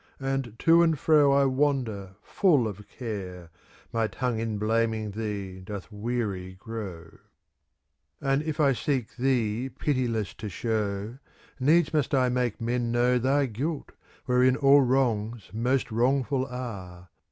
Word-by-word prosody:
And 135 -4 -2
to 165 +5 +5
and 165 -2 +3
fro 150 -1 +4
I 140 0 +4
wander 130 -8 0
full 150 - +3
of 105 -1 -8
care, 90 -8 -7 0.2
* - - -27
My 115 -1 +1
tongue 125 -1 -2
in 110 -2 -2
blaming 110 0 0
thee 100 -3 -5
doth 100 +2 -8
weary 105 -4 -3
grow; 95 -6 -8 1.0
And 135 +1 +1
if 155 0 -4
I 140 -3 +4
seek 130 -2 -2
thee 125 -1 0
pitiless 120 - -1
to 105 - -4
show. 105 +3 -2 0.4
Needs 160 +6 +3
must 145 -2 +1
I 130 -1 +3
make 125 -3 -1
men 120 0 -1
know 125 +1 +3
Thy 135 +3 +2
guilt, 135 +7 -4 0.3
wherein 125 0 +4
all 140 +1 +6
wrongs 120 -5 0
most 125 +3 0
wrong 130 +4 +2
ful 130 -1 -1
are. 95 -9 -7
120 Hz, 140 wpm, -27 LUFS, 105-135 Hz, 1.0 s, all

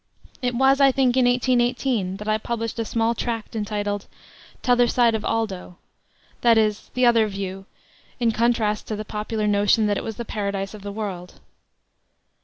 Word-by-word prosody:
It 245 -1 -1
was, 270 +2 +4
I 275 -1 +6
think, 255 -2 +2
in 260 -1 +4
1818 245 -5 +1
that 210 +1 -8
I 215 0 +1
published 230 0 -4
a 225 - -1
small 230 +1 0
tract 230 -1 -4
entitled 205 -1 -3 0.6
'Tother 245 -1 +4
Side 235 -1 +3
of 220 -1 -2
Oldo 195 -6 -3 0.6
that 235 -2 +5
is, 215 -1 0
the 250 0 +3
other 230 -2 +4
view, 195 -1 -6 0.5
in 235 -2 +2
contrast 225 -2 0
to 215 - -3
the 215 +1 -6
popular 215 +1 -3
notion 205 +1 +3
that 205 -1 +1
it - - -7
was 225 - -5
the 235 - -6
paradise 200 -2 -3
of 210 - -10
the 200 +1 -6
world. 195 -4 -6
220 Hz, 175 wpm, -23 LUFS, 205-240 Hz, 0.6 s, I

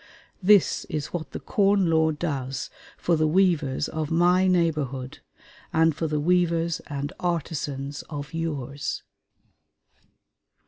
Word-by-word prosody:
This 200 0 +4
is 150 -2 -4
what 165 -2 -4
the - - -6
Corn 200 -1 +2
Law 160 -1 +3
does 135 -5 -3 0.3
for 175 - +1
the 155 0 +2
weavers 155 -6 +2
of 155 -2 -3
my 180 +3 +4
neighborhood, 150 -8 0 0.5
and 160 -1 +3
for 165 - -1
the 150 -1 -1
weavers 170 0 +1
and 145 0 -4
artisans 145 -5 -3
of 145 -2 -6
yours.... 145 -4 -3
160 Hz, 120 wpm, -25 LUFS, 145-175 Hz, 0.5 s, This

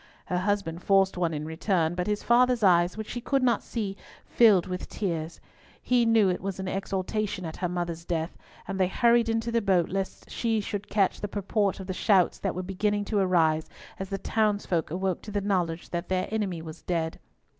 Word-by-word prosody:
Her 180 - -1
husband 185 -4 -1
forced 195 0 +3
one 175 -2 0
in 150 -1 -4
return; 160 +1 0
but 180 +1 -2
his 210 0 -1
father's 245 -1 +3
eyes, 175 0 +4
which 220 -1 -5
she 245 - -4
could 270 +2 +1
not 240 -3 +3
see, 205 -4 -4 0.3
filled 210 -7 +5
with 180 0 -5
tears. 165 -5 -3 0.4
He 245 -2 +2
knew 225 -3 +5
it 180 - 0
was 195 0 -4
in 190 - -4
exultation 195 0 -2
at 160 - -6
her 180 - -1
mother's 170 -1 -3
death, 165 -1 -2 0.3
and 195 0 -4
they 185 - +4
hurried 235 +3 +3
into 225 +1 0
the 230 0 +2
boat 185 -5 +2
lest 195 +1 -4
she 225 -2 0
should 205 0 -4
catch 200 -3 +1
the 205 - -2
purport 200 0 -1
of 190 - -6
the 185 - -3
shouts 185 -2 +3
that - - -2
were 185 - -3
beginning 205 +2 -1
to 210 0 0
arise 165 -4 +2 0.3
as 190 0 -5
the 195 - -2
townsfolk 205 -5 0
awoke 185 +2 -2
to - - -10
the 205 0 -1
knowledge 180 -4 -1
that 175 0 -3
their 185 0 0
enemy 195 -7 -2
was 160 0 -9
dead. 165 -2 -2
190 Hz, 205 wpm, -27 LUFS, 175-210 Hz, 0.4 s, filled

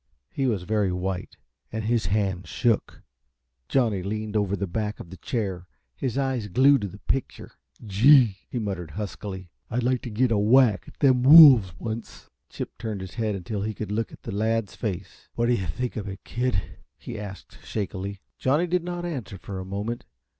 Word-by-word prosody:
He 135 - 0
was 105 -7 0
very 105 -1 +1
white, 90 0 -4 0.3
and 110 0 -3
his 115 -3 +1
hand 95 -3 -1
shook. 115 +4 0 0.7
Johnny 115 -8 +2
leaned 105 +2 -4
over 100 -2 +1
the 100 0 -2
back 105 +4 -3
of 85 - -10
the 95 - -9
chair, 95 - -3 0.3
his 130 -1 -3
eyes 130 -5 -1
glued 135 +6 +5
to 100 - -2
the 95 +2 -10
picture. 135 +5 -3 0.3
"Gee," 110 +1 +5
he - - -4
muttered, 95 -7 -3
huskily, 95 -3 -6 0.2
"I'd 120 +2 -1
like 125 0 +1
t' - - -6
git 120 +3 +1
a 105 - +3
whack 115 +1 +4
at - - -14
them 130 -3 +5
wolves 130 - +9
once." 115 +2 -7 0.2
Chip - - -7
turned 110 -4 -4
his 95 -1 -8
head 110 -3 -1
until 100 +2 -4
he 110 +1 -3
could 105 -2 -5
look 110 +1 -1
at - - -14
the - - -5
lad's 110 +1 0
face. 95 -4 -6
"What 120 - +1
do 120 - +3
you 95 -7 -1
think 125 +10 -3
of 105 -2 -4
it, 95 +1 -8
kid?" 120 -6 -2 0.2
he 115 -3 -7
asked, 100 -2 -9
shakily. 100 -1 -4 0.2
Johnny 145 +7 +2
did 180 0 0
not 175 0 -4
answer 125 - -5
for 95 +1 -7
a 95 - -6
moment. 105 +5 -4
110 Hz, 190 wpm, -25 LUFS, 95-125 Hz, 0.7 s, wolves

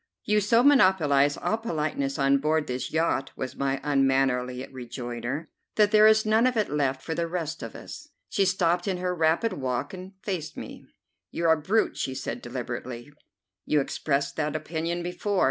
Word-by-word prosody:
"You 210 0 +2
so 230 +4 +4
monopolize 165 - +4
all 220 - -1
politeness 150 -9 -2
on 140 0 +3
board 155 +1 +1
this 125 -1 -4
yacht," 160 -4 0
was 130 - -5
my 135 0 -1
unmannerly 135 -2 +1
rejoinder, 125 +3 -5 0.3
"that 210 -1 +4
there 215 0 +7
is 220 0 +5
none 220 +3 +4
of 250 -2 0
it 215 - 0
left 135 -3 0
for 160 - -3
the 170 0 -1
rest 165 -2 -4
of - - -7
us." 300 0 -10 0.2
She 200 - +1
stopped 180 -1 +1
in 190 -2 0
her 180 0 -1
rapid 165 +7 +1
walk 130 +1 -3
and 185 +1 -9
faced 180 -6 -4
me. - - -9 0.4
"You're 165 -1 +1
a 160 -1 +2
brute," 215 +8 +1
she 130 - -2
said - - -4
deliberately. 125 +2 -6 0.5
"You 150 - +2
expressed 140 0 -1
that 150 -1 -1
opinion 165 +2 -3
before. 185 +3 -2
160 Hz, 175 wpm, -26 LUFS, 135-190 Hz, 0.5 s, there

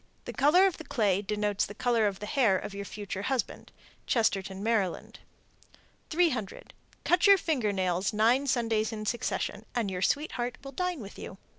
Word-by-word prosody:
The - - -6
color 310 +7 +5
of 380 -3 0
the - - -7
clay 205 -9 +1
denotes 210 0 -1
the 205 - -10
color 235 -2 +2
of 195 -2 -3
the 210 - -7
hair 220 -5 +3
of 195 - -6
your 200 0 -6
future 200 -1 -6
husband. 260 +3 -3 0.4
Chestertown, 195 -4 0
Md. 215 -5 -1 0.9
300. 305 - -1 0.3
Cut 355 +3 +4
your 400 0 +8
finger 265 - 0
nails 185 0 0
nine 235 +6 +3
Sundays 225 -3 +1
in 215 -1 -5
succession, 215 -2 -2
and 225 -5 0
your 180 -1 -4
sweetheart 250 +1 -1
will 275 - -8
dine 360 0 -2
with 200 -1 -10
you. 185 - -8
220 Hz, 170 wpm, -29 LUFS, 200-270 Hz, 0.9 s, your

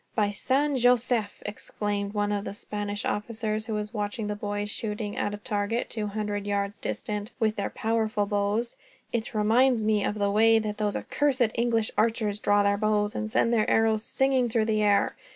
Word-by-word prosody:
"By 210 -2 +2
San 270 +7 +1
Josef!" 245 -3 +2
exclaimed 205 0 -3
one 205 0 +1
of 205 -1 -1
the 200 - -6
Spanish 205 0 -4
officers, 215 0 -2
after 210 -1 -1
watching 210 +1 -2
the 210 0 -2
boys 205 0 -3
shooting 210 -2 -4
at 205 0 -1
a - - -8
target, 210 +1 -2
two 215 -2 -2
hundred 205 -1 -3
yards 200 +1 -1
distant, 210 -1 -4
with 220 -2 +1
their 200 - -2
powerful 220 -2 0
bows; 205 +3 -1 0.4
"it 230 0 -2
reminds 225 +2 +3
me 215 -2 +2
of 205 - -1
the 200 -1 +1
way 225 +2 +5
that 210 -1 -2
those 210 -1 -1
accursed 260 -6 +1
English 230 -2 +1
archers 215 -2 +1
draw 205 -1 +3
their 200 0 +2
bows, 210 0 +1
and 215 - -3
send 230 0 +2
their 220 -2 +2
arrows 220 -1 +3
singing 265 -2 +1
through 225 -1 +1
the 215 -1 +1
air. 205 -1 +3
215 Hz, 185 wpm, -27 LUFS, 205-225 Hz, 0.4 s, way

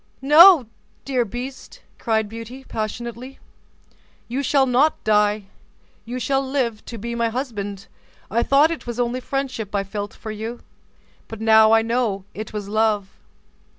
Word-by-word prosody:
"No, 315 +1 +8 0.4
dear 260 -3 +1
beast," 250 +5 -8 0.2
cried 220 -2 0
Beauty, 230 +4 -9
passionately, 235 +3 -6 0.9
"you 255 +4 -2
shall 275 0 +3
not 265 +5 +2
die; 210 -1 +2 0.6
you 245 +2 -5
shall 270 +3 0
live 260 -5 -2
to 235 - -7
be 235 +3 -5
my 235 -1 0
husband. 205 -6 -5 0.5
I 235 - +2
thought 280 +6 +4
it 330 - -6
was 240 0 -5
only 245 +1 0
friendship 255 -6 -4
I 200 - +1
felt 205 +1 -6
for 220 - -7
you, 220 +3 -6 0.7
but 225 - -8
now 220 0 +5
I 225 0 +5
know 225 -5 -1
it 215 +1 -7
was 210 -2 -5
love." 210 -2 0
230 Hz, 150 wpm, -22 LUFS, 215-260 Hz, 0.9 s, No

